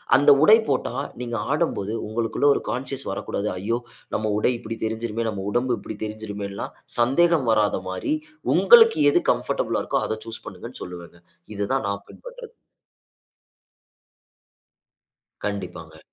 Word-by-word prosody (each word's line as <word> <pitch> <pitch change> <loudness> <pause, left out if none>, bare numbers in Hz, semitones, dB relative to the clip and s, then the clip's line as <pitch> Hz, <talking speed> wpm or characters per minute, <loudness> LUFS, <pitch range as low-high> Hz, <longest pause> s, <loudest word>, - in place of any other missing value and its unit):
அந்த 145 +2 +6
உடை 215 - +9
போட்டா, 130 -3 0 0.3
நீங்க 120 -1 -4 0.2
ஆடும்போது 145 - 0
உங்களுக்குள 115 +5 -1
ஒரு - - -2
கான்ஷியஸ் 130 +4 -3
வரக்கூடாது. 100 +1 -3
ஐயோ! 110 +6 -1 0.4
நம்ம 110 0 -1
உடை 110 - +2
இப்படி 115 0 -6
தெரிஞ்சுருமே, 115 +1 -2
நம்ம 100 -3 -4
உடம்பு 120 +1 +1
இப்படி 110 - -8
தெரிஞ்சுருமேன்ல்லாம் 105 -2 -6 0.2
சந்தேகம் 145 +3 +3
வராத 105 -3 +2
மாரி, 95 - -2 0.4
உங்களுக்கு 460 -1 +7
எது - - +3
கம்ஃபர்டபிளா - - -1
இருக்குதோ, - - 0
அத 110 - -3
சூஸ் 115 0 -6
பண்ணுங்கனு - - -9
சொல்லுவேங்க. 85 -1 -10 0.4
இத 100 0 -2
தான் 135 -4 0
நான் 100 0 -4
பின்பற்றுறது. - - -11 2.9
கண்டிப்பாங்க. - - -5
115 Hz, 125 wpm, -24 LUFS, 105-135 Hz, 2.9 s, உடை